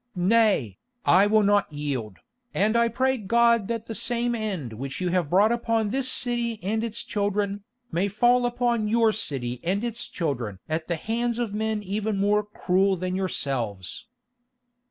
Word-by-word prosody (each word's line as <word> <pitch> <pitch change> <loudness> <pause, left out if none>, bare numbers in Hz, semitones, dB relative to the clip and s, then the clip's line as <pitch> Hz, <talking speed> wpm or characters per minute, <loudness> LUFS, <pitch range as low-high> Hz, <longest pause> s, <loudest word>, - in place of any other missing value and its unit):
"Nay, 185 - +2 0.3
I 190 +3 +5
will 215 0 +4
not 205 -3 +2
yield, 135 -9 -4 0.4
and 215 +3 +2
I 235 0 +4
pray 260 +2 0
God 235 0 +3
that 230 -1 -3
the 225 - -6
same 240 +1 0
end 195 - -3
which 135 +4 -6
you 180 -1 -1
have 175 -4 0
brought 200 +6 +4
upon 230 -2 0
this 260 0 +3
city 240 -2 0
and 220 +4 -1
its 230 0 -2
children, 205 0 -2 0.3
may 180 +4 +1
fall 245 +4 +3
upon 240 -2 0
your 225 0 +3
city 130 - -2
and 195 +5 -1
its 235 -1 -3
children 125 - -3
at 160 0 -3
the 170 - -1
hands 235 +6 -2
of 235 -4 -2
men 215 0 -2
even 205 +2 -2
more 205 +1 +2
cruel 195 -2 +1
than 185 +1 -3
yourselves." 135 - -3
210 Hz, 165 wpm, -25 LUFS, 180-230 Hz, 0.4 s, I